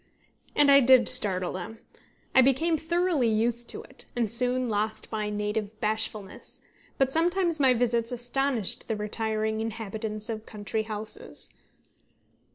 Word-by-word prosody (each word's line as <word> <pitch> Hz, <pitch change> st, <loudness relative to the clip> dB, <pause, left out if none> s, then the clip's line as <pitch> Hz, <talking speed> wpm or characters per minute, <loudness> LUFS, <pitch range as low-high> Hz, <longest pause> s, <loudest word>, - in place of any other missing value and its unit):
And 290 Hz, -1 st, +5 dB
I 280 Hz, -, +8 dB
did 255 Hz, -3 st, +5 dB
startle 185 Hz, -3 st, +3 dB
them. 195 Hz, +5 st, -7 dB, 0.6 s
I 260 Hz, -, +7 dB
became 275 Hz, +6 st, +2 dB
thoroughly 330 Hz, -4 st, +1 dB
used 235 Hz, +2 st, 0 dB
to 435 Hz, -, -7 dB
it, -, -, -11 dB
and 235 Hz, -4 st, 0 dB
soon 250 Hz, +1 st, +2 dB
lost 215 Hz, 0 st, -2 dB
my 215 Hz, -1 st, -2 dB
native 210 Hz, 0 st, -3 dB
bashfulness; 215 Hz, -2 st, -1 dB, 0.4 s
but 270 Hz, 0 st, +2 dB
sometimes 345 Hz, 0 st, +1 dB
my 260 Hz, -3 st, +4 dB
visits 235 Hz, -1 st, +1 dB
astonished 245 Hz, -2 st, -1 dB
the 225 Hz, -, -1 dB
retiring 220 Hz, +1 st, -1 dB
inhabitants 220 Hz, -1 st, -4 dB
of 220 Hz, -1 st, -5 dB
country 215 Hz, +1 st, -3 dB
houses. 215 Hz, 0 st, -6 dB
225 Hz, 135 wpm, -27 LUFS, 215-260 Hz, 0.6 s, I